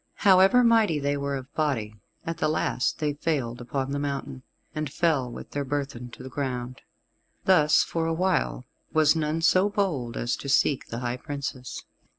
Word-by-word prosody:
However 195 +6 +6
mighty 225 -8 +4
they 145 0 0
were 140 0 -2
of 130 0 -8
body, 130 -9 -1 0.3
at 165 0 -4
the - - +1
last 130 -4 0
they 150 -1 -1
failed 135 -6 -2
upon 130 +2 -3
the 140 - -1
mountain, 140 -2 -4 0.3
and 155 -3 -3
fell 145 -7 +1
with - - -9
their 145 - -2
burthen 135 -3 -4
to - - -11
the - - -7
ground. 125 -3 -4 0.6
Thus, 155 -5 +5
for 165 -1 -2
a 165 - 0
while, 180 -7 0 0.3
was 155 -1 +4
none 160 0 -1
so 185 +5 +4
bold 165 - -1
as 120 - -1
to 140 - -6
seek 135 0 +2
the 115 +1 -5
high 120 0 -2
Princess. 135 -3 -6
145 Hz, 175 wpm, -26 LUFS, 130-160 Hz, 0.6 s, However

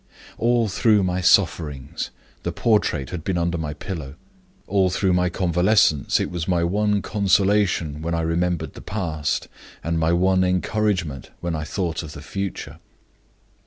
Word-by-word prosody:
"All 120 -1 +2
through 105 +1 +3
my 90 0 0
sufferings 80 -7 +1 0.3
the - - -2
portrait 105 - +1
had 85 -3 -5
been 95 0 -1
under 85 0 0
my 75 -2 -4
pillow. 75 -4 -6 0.5
All 95 -2 +2
through 90 +2 +1
my 90 0 +2
convalescence 90 -3 +2
it - - -2
was 85 -2 -3
my 90 -2 +2
one 105 +3 +1
consolation 100 -6 +1
when 85 +1 -1
I 85 - 0
remembered 85 -1 -1
the - - -10
past, 80 -7 -2 0.4
and 85 +1 -1
my 80 0 +2
one 95 +2 +3
encouragement 90 - 0
when 85 -1 -2
I 75 -1 -3
thought 85 -2 -2
of 80 -2 -8
the 70 - -9
future. 100 +5 -5
90 Hz, 155 wpm, -23 LUFS, 80-100 Hz, 0.5 s, through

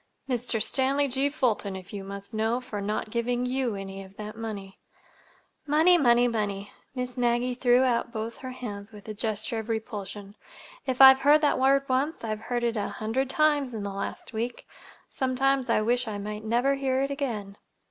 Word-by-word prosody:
"Mr. 245 -3 0
Stanley 275 +5 +1
G. 270 +2 0
Fulton, 230 -9 0
if 190 +1 -10
you 200 -1 -5
must 200 +2 -7
know, 220 +3 +1
for 230 -5 -6
not 210 +1 -2
giving 245 +1 0
you 250 -3 -1
any 195 0 -6
of 190 +1 -16
that 210 0 -7
money." 205 -4 -7 0.9
"Money, 315 +5 +5
money, 245 -6 +5
money!" 205 -3 -2 0.2
Miss 250 0 -4
Maggie 245 +1 +1
threw 245 0 +4
out 240 -2 +1
both 225 0 -5
her 260 - -7
hands 215 -5 -7
with 210 -1 -13
a 215 - -4
gesture 220 +1 -2
of 220 +1 -7
repulsion. 205 -3 -5 0.5
"If 260 0 +1
I've 265 0 +10
heard 295 +3 +5
that 295 -3 +2
word 275 +1 +3
once, 270 +5 0
I've 215 -1 -2
heard 240 -1 0
it 235 -1 +1
a 205 - -1
hundred 250 +5 -2
times 290 -4 +2
in 210 - -4
the 200 -1 -4
last 195 +3 -5
week. 235 +2 -3 0.5
Sometimes 265 0 +1
I 225 - +3
wish 245 +2 +1
I 210 -2 -3
might 210 +1 -5
never 240 +5 +2
hear 270 -1 0
it 275 - -2
again." 220 -8 -4
240 Hz, 190 wpm, -27 LUFS, 210-260 Hz, 0.9 s, I've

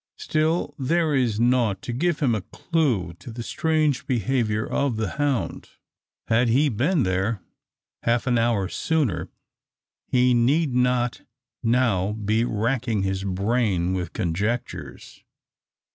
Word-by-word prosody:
Still 155 0 0
there 160 +3 +1
is 120 -6 +1
nought 120 -5 +2
to 120 - -4
give 170 +6 0
him 130 -5 +3
a 110 - -1
clue 120 - -1
to - - -10
the 120 +1 -6
strange 155 -1 0
behaviour 115 -2 0
of 140 -4 0
the 110 -3 -1
hound. 140 -4 -1 0.6
Had 120 +2 +3
he 140 +6 +3
been 140 - +1
there 95 +2 -1 0.6
half 120 +1 +1
an 120 -2 +2
hour 115 -5 +1
sooner, 145 - -1 0.8
he 125 0 +3
need 135 +5 +2
not 125 -1 +1 0.4
now 115 -5 +2
be 110 +1 0
racking 115 -1 0
his 95 0 -1
brain 100 -2 0
with 90 -3 -3
conjectures. 105 +8 -4
120 Hz, 130 wpm, -24 LUFS, 105-135 Hz, 0.8 s, him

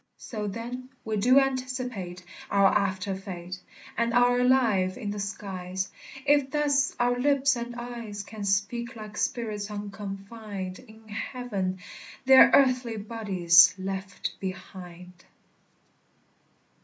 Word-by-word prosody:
So, 210 -3 -5
then, 240 +5 -6 0.2
we 220 -1 -1
do 250 +6 +5
anticipate 255 -9 -3 0.3
Our 200 -1 +5
after 195 -1 0
fate, 185 -1 -7 0.3
And 235 +1 0
are 245 0 +4
alive 230 -8 +3
i' - - -7
the 205 0 -3
skies, 190 -2 -4 0.3
If 285 -1 +4
thus 285 -1 +1
our 245 0 +2
lips 280 0 +3
and 240 0 -5
eyes 235 -4 -6
Can 215 0 -8
speak 210 +5 -1
like 215 -1 -9
spirits 210 -3 -2
unconfined 200 -1 -6
In 220 0 -17
heaven, 210 -4 -3 0.5
their 265 0 +9
earthly 255 -4 +3
bodies 195 -6 +4
left 190 0 -4
behind. 180 -1 -8
210 Hz, 115 wpm, -27 LUFS, 195-245 Hz, 0.5 s, their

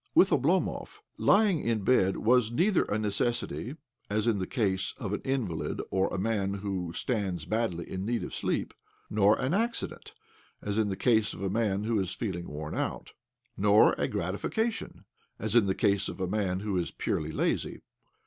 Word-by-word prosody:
With - - +6
Oblomov, - - +1 0.2
lying 200 -5 +4
in 115 -5 -1
bed 95 -4 +3
was 120 0 +3
neither 175 - +2
a 105 - -1
necessity 115 +5 -1 0.3
(as 105 +1 0
in 115 -4 +2
the 95 - -2
case 95 -7 0
of 105 -7 -4
an - - -2
invalid 120 -12 -2
or 95 0 +2
of - - -6
a - - -1
man 100 -1 0
who 95 -4 -3
stands 95 - -2
badly 90 -4 -1
in 95 0 -4
need 115 +3 -1
of - - -6
sleep) - - -2 0.4
nor 105 0 +4
an 130 +5 -1
accident 230 +4 -2 0.4
(as 105 +1 -2
in 110 - +2
the 95 - -3
case 110 -4 +2
of - - -7
a 95 - -1
man 105 -2 0
who 110 -1 +1
is 95 -1 -2
feeling 90 -7 -4
worn 75 +1 -6
out) - - -3 0.4
nor 105 +2 +5
a - - +1
gratification 205 - -2 0.3
(as 110 +1 -2
in 115 -4 +5
the 95 - +1
case 100 -2 +2
of - - -8
a 95 - 0
man 95 -1 -1
who 100 -3 -1
is 85 - -2
purely 75 0 -2
lazy). - - -1
105 Hz, 185 wpm, -29 LUFS, 95-115 Hz, 0.4 s, With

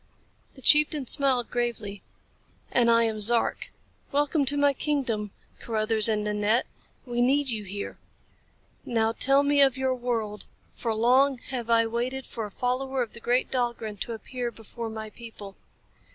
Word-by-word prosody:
The 265 - -15
chieftain 300 0 +5
smiled 260 -2 +2
gravely. 230 -5 -3 0.7
"And 240 -1 +3
I 230 0 +5
am 220 -1 -1
Zark. 230 +2 +2 0.4
Welcome 290 +1 +1
to 285 +2 +3
my 285 0 +3
kingdom, 255 -8 -1 0.3
Carruthers 220 -1 +1
and 210 -1 0
Nanette. 210 +3 +1 0.4
We 240 -1 -2
need 275 +3 +2
you 215 -3 -3
here. 200 +1 -6 0.8
Now 225 -2 +1
tell 275 +4 +3
me 285 0 +3
of 270 -2 +4
your 260 0 0
world, 225 -5 -3 0.3
for 230 - -3
long 255 +4 +3
have 240 -3 -4
I 230 0 +4
waited 245 +4 -3
for 225 - -5
a - - -7
follower 255 +4 -1
of 230 - -10
the - - -9
great 245 +2 0
Dahlgren 235 -4 -2
to 230 - -4
appear 240 +2 -5
before 230 0 -8
my 220 -1 -7
people." 210 -4 -11
240 Hz, 155 wpm, -26 LUFS, 220-265 Hz, 0.8 s, chieftain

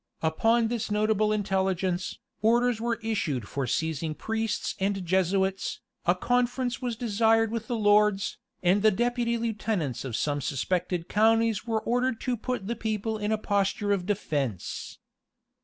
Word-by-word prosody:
Upon 225 +8 +2
this 235 -3 -2
notable 215 0 +2
intelligence, 190 -3 0 0.2
orders 235 +1 +3
were 235 0 0
issued 155 - -1
for 135 -2 -3
seizing 160 +3 -1
priests 225 +2 -2
and 195 -1 -1
Jesuits, 190 +2 +1 0.3
a 175 - +5
conference 245 +4 0
was 245 -2 -2
desired 225 0 +2
with 225 -1 -3
the 240 - -1
lords, 205 -2 +3 0.2
and 185 +3 +4
the 215 - +6
deputy 235 +2 0
lieutenants 215 - -2
of 130 -5 -4
some 145 +2 0
suspected 175 +6 -1
counties 225 0 +2
were 220 -1 0
ordered 245 0 0
to 250 -2 0
put 245 -2 -3
the 235 +4 -2
people 220 0 -2
in 210 +1 -1
a 220 - +2
posture 205 0 0
of 190 -3 0
defence. 145 - -2
210 Hz, 145 wpm, -27 LUFS, 185-225 Hz, 0.3 s, the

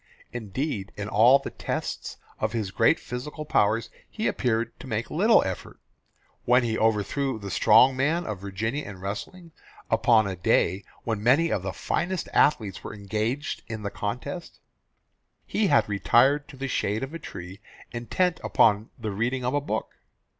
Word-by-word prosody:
Indeed 110 -1 -3
in 105 0 -4
all 115 +6 +6
the 140 - -7
tests - - -4 0.2
of - - -1
his 110 -5 -2
great 115 +10 +3
physical 150 +5 -6
powers 110 -3 +1 0.2
he 220 - -4
appeared 115 -2 0
to - - -9
make - - -3
little - - +5
effort. - - -6 0.6
When 125 +1 +4
he 115 -2 0
overthrew 115 +5 0
the 100 -2 -7
strong 115 +7 +6
man 155 +7 +1
of 105 -3 -4
Virginia 110 +9 -3
in 100 -3 -9
wrestling, 135 - -6 0.4
upon 115 -1 +4
a 95 -1 -3
day 90 +2 +1 0.2
when 110 -3 -2
many 140 +9 +4
of 100 - 0
the 95 +1 -3
finest 175 - -2
athletes 110 -10 +2
were - - -7
engaged 110 +7 -2
in 110 -1 -6
the 100 - -3
contest, 125 - -5 0.9
he 210 -1 +1
had 145 -4 +4
retired 130 +8 +3
to 140 - -12
the 135 +1 -3
shade 110 -3 -1
of 135 +4 -6
a 165 - -5
tree 95 - -9 0.3
intent 165 +9 0
upon 105 +1 +3
the 110 -3 -4
reading 125 +5 -1
of 125 - 0
a 145 - +1
book. 110 -6 -3
115 Hz, 165 wpm, -26 LUFS, 105-140 Hz, 0.9 s, all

